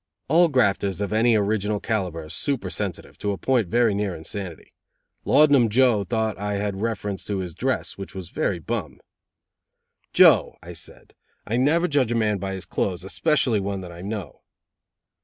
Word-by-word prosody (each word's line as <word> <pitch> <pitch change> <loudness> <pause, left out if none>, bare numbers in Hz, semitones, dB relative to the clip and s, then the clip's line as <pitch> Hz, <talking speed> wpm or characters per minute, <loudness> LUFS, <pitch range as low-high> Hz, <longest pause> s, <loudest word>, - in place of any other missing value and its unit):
All 170 +4 +5
grafters 100 - +1
of 100 0 -2
any 115 +1 +4
original 105 0 0
calibre 90 -8 -2
are - - -12
super 140 - -2
sensitive, - - -5
to 100 -1 -1
a - - -5
point 125 -4 +1
very 115 +3 +2
near 100 -3 -2
insanity. 85 +1 -7 0.5
Laudanum 145 -6 +5
Joe 120 -2 +3
thought 110 +2 -2
I 105 0 -2
had 100 -1 -2
reference 105 -3 -2
to 100 - -2
his 90 -3 -4
dress, - - -2
which 95 0 -8
was 90 -2 -7
very 95 - -1
bum. 85 -4 -4 1.1
"Joe," - - +5
I 85 +1 -9
said, 80 0 -11 0.3
"I 110 - -2
never 160 +7 +3
judge 140 -7 +1
a - - +1
man 105 -3 +1
by 95 0 -4
his 95 0 -6
clothes, 90 -2 -2
especially 125 - +1
one 100 0 -3
that 90 -1 -9
I 85 0 -10
know." 100 -4 -6
105 Hz, 175 wpm, -24 LUFS, 95-120 Hz, 1.1 s, All